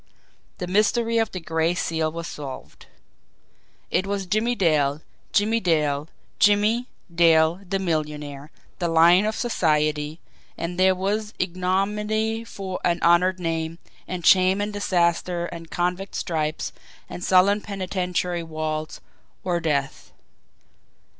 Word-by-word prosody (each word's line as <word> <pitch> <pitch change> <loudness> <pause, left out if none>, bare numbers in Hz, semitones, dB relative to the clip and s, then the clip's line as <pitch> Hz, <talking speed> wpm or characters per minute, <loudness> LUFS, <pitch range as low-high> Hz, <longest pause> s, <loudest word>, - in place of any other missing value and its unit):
The 180 - -4
mystery 225 +5 +2
of 225 -2 0
the 185 - -5
Gray 165 +1 0
Seal 160 -2 -1
was 170 +1 -6
solved! 140 -5 -8 1.0
It 185 - +1
was 200 -1 -2
Jimmie 220 +6 0
Dale, 150 -6 +1 0.3
Jimmie 220 +3 +2
Dale, 155 -5 0 0.3
Jimmie, 210 +4 +3 0.3
Dale, 165 +1 +4
the 195 - +1
millionaire, 150 -5 -3 0.3
the 175 - 0
lion 170 +4 +5
of 215 - -1
society 155 -7 0 0.4
and 175 +2 -4
there 185 0 +5
was 210 +3 -2
ignominy 210 +5 -1
for 195 -5 -6
an 175 -1 +1
honoured 180 +2 +4
name, 165 -1 -2 0.3
and 180 -3 -5
shame 185 +1 +5
and 205 +1 -2
disaster 175 -3 0
and 165 -1 -8
convict 180 +2 -2
stripes 155 -2 -2 0.3
and 175 - -7
sullen 195 +3 +4
penitentiary 180 -3 -2
walls 155 -1 -4 0.4
or 175 -2 0
death! 145 -5 -2
180 Hz, 120 wpm, -24 LUFS, 160-195 Hz, 1.0 s, lion